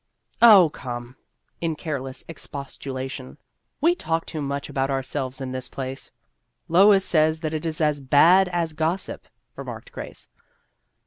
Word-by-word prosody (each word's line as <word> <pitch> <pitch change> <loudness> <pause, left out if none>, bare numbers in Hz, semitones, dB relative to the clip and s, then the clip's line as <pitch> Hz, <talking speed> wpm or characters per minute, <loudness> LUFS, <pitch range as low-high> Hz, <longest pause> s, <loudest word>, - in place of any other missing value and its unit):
" - - -35
Oh, 180 -5 +6
come," 120 -1 -7 0.5
in 165 -2 -1
careless 135 -4 -5
expostulation, 135 -3 -6 0.2
" - - -51
we 335 +4 +5
talk 165 - -2
too 155 - -5
much 140 +1 -3
about 135 0 -1
ourselves 135 0 -3
in 130 -1 -5
this 130 -1 -4
place." 135 0 -5 0.3
" - - -51
Lois 195 0 +7
says 155 -1 +2
that 155 -1 -3
it 155 +1 -2
is 155 -1 -2
as 150 -2 +1
bad 170 +8 +5
as 170 -3 -1
gossip," 160 +5 -2 0.3
remarked - - -8
Grace. - - -9
150 Hz, 150 wpm, -24 LUFS, 135-165 Hz, 0.5 s, Lois